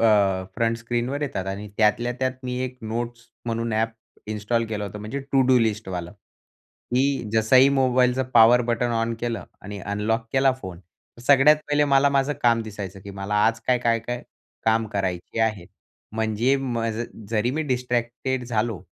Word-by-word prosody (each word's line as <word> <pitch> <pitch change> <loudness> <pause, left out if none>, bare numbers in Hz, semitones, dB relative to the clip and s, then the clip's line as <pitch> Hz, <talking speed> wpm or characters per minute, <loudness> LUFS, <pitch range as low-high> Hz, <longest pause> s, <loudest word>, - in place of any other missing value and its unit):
अ, 100 -4 +3
front 115 +1 +1
स्क्रीनवर 120 +4 -2
येतात 130 -10 -3
आणि 100 +2 -5
त्यातल्या 115 +3 +2
त्यात 130 0 0
मी 125 0 -3
एक 130 0 -6
नोट्स 115 +2 -4 0.2
म्हणून 115 0 -2
ॲप 110 +1 +1 0.4
इन्स्टॉल 110 +2 0
केलं 105 -2 -3
होतं, 100 +1 -7
म्हणजे 110 +7 -5
टु 135 - +5
डू 130 -1 +5
लिस्टवाला. 100 -6 -2 0.8
की 135 -2 +1
जसंही 125 +5 +5
मोबाईलचं 130 -1 +2
पॉवर 120 +1 +7
बटन 120 +1 +1
ऑन 115 0 0
केलं 115 -6 -3 0.2
आणि 100 +1 -7
अनलॉक 105 +4 -1
केला 135 0 +4
फोन. 90 -5 -7
तर 95 +6 -21
सगळ्यात 140 +3 +6
पहिले 145 0 +3
मला 140 0 +4
माझं 140 +1 +1
काम 115 -1 +4
दिसायचं. 100 -3 -7
की 100 - -9
मला 100 +1 -4
आज 115 0 0
काय, 125 -1 +3
काय-काय 120 0 -1 0.4
काम 110 0 +2
करायचे 95 +2 -2
आहेत? 110 -6 0 0.5
म्हणजे 110 +4 +1
म 125 -4 -2 0.5
जरी 115 +1 +1
मी 155 +4 -1
डिस्ट्रॅक्टेड 125 -1 -2
झालो, 115 -4 -1
115 Hz, 160 wpm, -24 LUFS, 105-125 Hz, 0.8 s, पॉवर